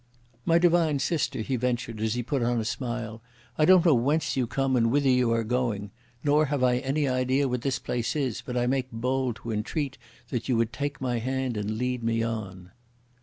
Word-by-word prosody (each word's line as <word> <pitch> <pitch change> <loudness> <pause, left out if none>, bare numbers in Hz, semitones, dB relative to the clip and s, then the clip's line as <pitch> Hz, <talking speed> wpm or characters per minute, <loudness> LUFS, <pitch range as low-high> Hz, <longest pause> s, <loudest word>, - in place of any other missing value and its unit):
"My 165 - +4
divine 170 -3 +3
sister," 140 -4 -1
he 130 +4 -1
ventured, 120 -2 -2
as 110 +1 0
he 120 - -2
put 135 +2 -1
on 120 0 +1
a 110 - -2
smile. 115 -2 -4 0.3
"I 155 - +3
don't 185 0 +6
know 165 - +6
whence 140 +6 +1
you 130 -3 0
come, 135 +1 0
and 115 -2 +3
whither 140 +3 +2
you 125 -2 +3
are 115 0 +1
going. 110 -4 -1 0.3
Nor 150 +1 +4
have 140 -2 -1
I 125 -1 +4
any 140 +3 0
idea 130 +2 +1
what 125 -1 -2
this 135 0 0
place 120 +2 -2
is, 135 -7 -1
but 125 -1 -4
I 120 - +2
make 130 0 -1
bold 125 +1 -1
to 115 - -4
entreat 130 +6 -3 0.3
that 120 0 -3
you 125 - +3
would 115 0 0
take 145 +2 -3
my 125 -2 0
hand 130 0 -2
and 105 +1 -2
lead 125 +1 -1
me 115 0 +1
on." 95 -5 -5
125 Hz, 215 wpm, -27 LUFS, 115-135 Hz, 0.3 s, don't